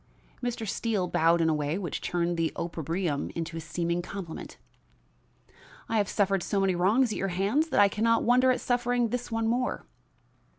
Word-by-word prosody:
Mr. 240 -3 -3
Steele 200 -2 -1
bowed 170 -1 +3
in 165 - +3
a 160 - +3
way 150 +2 -1
which 180 -6 -4
turned 175 0 -1
the 165 -1 0
opprobrium 165 -2 -2
into 165 0 -4
a - - -4
seeming 170 +2 -2
compliment. 180 -2 -7 1.3
"I 225 - 0
have 205 -2 +1
suffered 195 -2 +1
so 200 +3 -1
many 195 -1 +2
wrongs 215 +8 +3
at - - -3
your 195 - 0
hands 200 - +1
that - - +1
I 205 - +7
can 210 +2 -3
not 230 0 +3
wonder 250 +2 +4
at 255 - +2
suffering 245 -1 +1
this 245 +1 -4
one 225 0 0
more." 245 +2 -1
195 Hz, 185 wpm, -28 LUFS, 170-230 Hz, 1.3 s, I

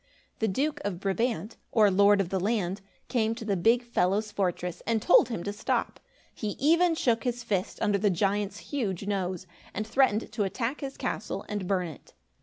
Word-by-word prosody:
The 220 - +1
Duke 290 +8 -1
of 190 -4 -3
Brabant, 210 +1 -1
or 210 -3 +5
Lord 200 +2 +5
of 180 - -3
the 190 - 0
land, 200 -1 -1 0.3
came 225 -3 +1
to 230 -1 -7
the 205 -2 +1
big 230 +7 +3
fellow's 210 -2 0
fortress 180 -3 -2
and 230 -1 +2
told 225 - +5
him 200 -8 -3
to 205 - -3
stop. 205 - -1 0.3
He 210 -3 -4
even 335 +3 +4
shook 235 -7 +1
his 245 -1 -2
fist 195 -5 -2
under 205 -1 +2
the 205 +1 +3
giant's 200 +2 0 0.2
huge 200 -9 -1
nose, 185 -3 -2 0.3
and 215 - -2
threatened 230 -1 +2
to 210 - -1
attack 230 +8 -2
his 275 -1 -5
castle - - -3
and 205 -3 -3
burn 185 -2 0
it. 160 - -12
205 Hz, 190 wpm, -28 LUFS, 190-235 Hz, 0.3 s, or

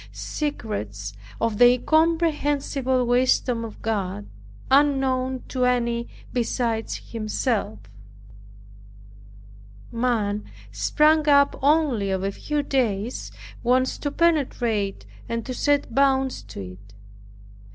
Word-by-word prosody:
Secrets 105 - -4 0.3
of 225 -2 -1
the 245 0 +8
incomprehensible 290 -4 +1
wisdom 245 -1 +2
of 225 -2 -8
God, 195 - -2 0.5
unknown 265 -2 +2
to 255 -1 -1
any 235 -1 +1 0.3
besides 230 -2 -2
Himself! 215 - -1 2.1
Man, 225 -4 0 0.3
sprung 305 0 +3
up 280 -1 +5
only 280 -8 +2
of 190 0 -1
a 195 - 0
few 295 +7 -2
days, 240 -5 -1 0.3
wants 255 +2 +1
to 290 - -2
penetrate, 250 -11 0 0.2
and 230 -1 -3
to 255 - -4
set 285 -1 +1
bounds 270 0 +2
to - - -9
it. 95 +2 -11
250 Hz, 100 wpm, -24 LUFS, 220-280 Hz, 2.1 s, the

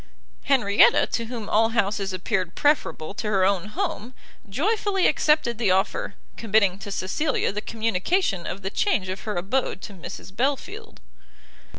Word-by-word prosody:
Henrietta, 215 -7 +5
to 230 - -2
whom 225 -2 -6
all 225 +1 +3
houses 200 -2 0
appeared 185 -1 -2
preferable 195 - 0
to 210 - -4
her 195 -3 +2
own 195 -1 +1
home, 260 - -4 0.3
joyfully 390 - 0
accepted 300 -7 +2
the 220 -5 +2
offer, 195 - 0 0.2
committing 200 -4 +2
to 200 - -7
Cecilia 260 +10 -1
the 210 +1 -4
communication 220 - -1
of 195 - -5
the 195 - -3
change 205 - 0
of 190 +1 -6
her 210 - -3
abode 200 +4 -1
to 205 - -7
Mrs 190 +1 -9
Belfield. 335 - -3
215 Hz, 150 wpm, -24 LUFS, 195-275 Hz, 0.3 s, Henrietta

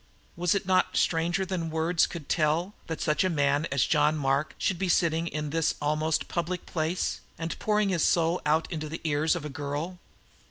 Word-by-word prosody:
Was 175 +2 +1
it 200 0 -1
not 185 0 +2
stranger 175 +3 +1
than 175 -3 -3
words 160 +2 +2
could 165 -5 -8
tell 165 +5 +1
that 160 -1 -4
such 150 +3 +2
a 185 - +2
man 145 -1 +1
as 135 -1 +2
John 150 0 +3
Mark 140 +1 0
should 185 -3 -1
be 190 - 0
sitting 165 -1 +2
in 150 -2 -3
this 165 0 +1
almost 155 +2 0
public 175 +1 -3
place 165 +2 -2 0.2
and 165 0 -4
pouring 210 -1 +2
his 180 -4 +1
soul 170 +1 +2
out 155 +2 +2
into 155 -2 -4
the 165 - -6
ear 150 -1 0
of 160 -1 +1
a - - -2
girl? 145 +5 -4
160 Hz, 195 wpm, -28 LUFS, 150-175 Hz, 0.2 s, John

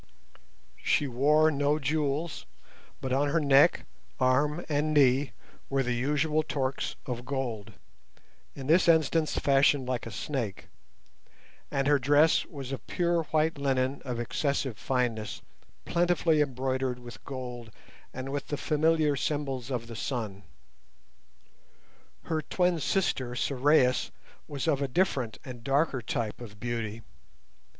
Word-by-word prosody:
She 145 - +2
wore 150 +5 +3
no 145 +1 +1
jewels, 150 - -2 0.5
but 130 -1 -2
on 140 +2 +2
her 165 +3 +2
neck, 140 -2 +4 0.3
arm, 145 +6 +2
and 150 0 0
knee 135 0 +4 0.4
were 135 0 +1
the 125 -1 -1
usual 150 +5 +1
torques 135 -3 -2
of 120 -2 -4
gold, 120 -6 -4 0.8
in 135 - -7
this 165 +6 +4
instance 160 -1 +3
fashioned 135 -1 +3
like 125 -3 -2
a - - -7
snake; 115 -2 -4 1.0
and 135 -1 0
her 145 0 +4
dress 145 +4 +4
was 135 -3 -7
of 135 - -6
pure 170 -2 0
white 155 0 0
linen 135 -1 0
of 125 -3 -4
excessive 135 +1 -1
fineness, 120 -4 -2 0.4
plentifully 170 -2 +2
embroidered 130 -2 -1
with 120 -1 -11
gold 125 -4 -7 0.4
and 130 +1 -6
with 145 0 -3
the 145 - -3
familiar 155 0 +2
symbols 135 -3 -2
of 120 -3 -3
the 115 0 -9
sun. 110 -5 -4 1.8
Her 160 -1 -1
twin 180 +1 +1
sister, 130 -7 0
Sorais, 130 0 +2 0.4
was 140 -3 -4
of 140 - +2
a 140 - +1
different 130 - 0
and 120 -3 -9
darker 140 0 +1
type 110 +1 -3
of 105 -3 -10
beauty. 115 -2 -4
135 Hz, 130 wpm, -28 LUFS, 125-150 Hz, 1.8 s, neck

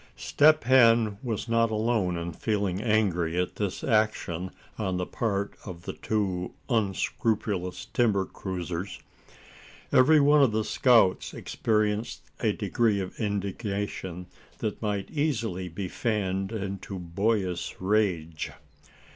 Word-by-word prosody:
Step 155 +1 +4
Hen 115 -4 +5
was 115 -3 -3
not 115 0 +3
alone 110 -5 0
in 85 0 -4
feeling 100 -1 -1
angry 90 -7 +1
at 90 - -2
this 100 -3 -3
action 105 -6 0 0.3
on 95 -4 -1
the 90 - -1
part 100 -2 -2
of 90 -3 -8
the - - -5
two 95 -4 -2 0.2
unscrupulous 100 -3 -1
timber 105 -6 +2
cruisers. 90 0 -5 0.9
Every 150 +5 +6
one 145 +1 +5
of 130 -6 +4
the 110 0 +1
scouts 115 -6 +3
experienced 105 0 -1 0.2
a - - +2
degree 110 -4 +1
of 95 -1 -6
indignation 100 -3 -3 0.3
that 105 - -3
might 100 -3 -2
easily 115 - -1
be 95 +3 -4
fanned 95 -2 -1
into 100 -2 -5
boyish 95 +1 -1
rage. 90 -6 0
100 Hz, 120 wpm, -27 LUFS, 95-110 Hz, 0.9 s, Every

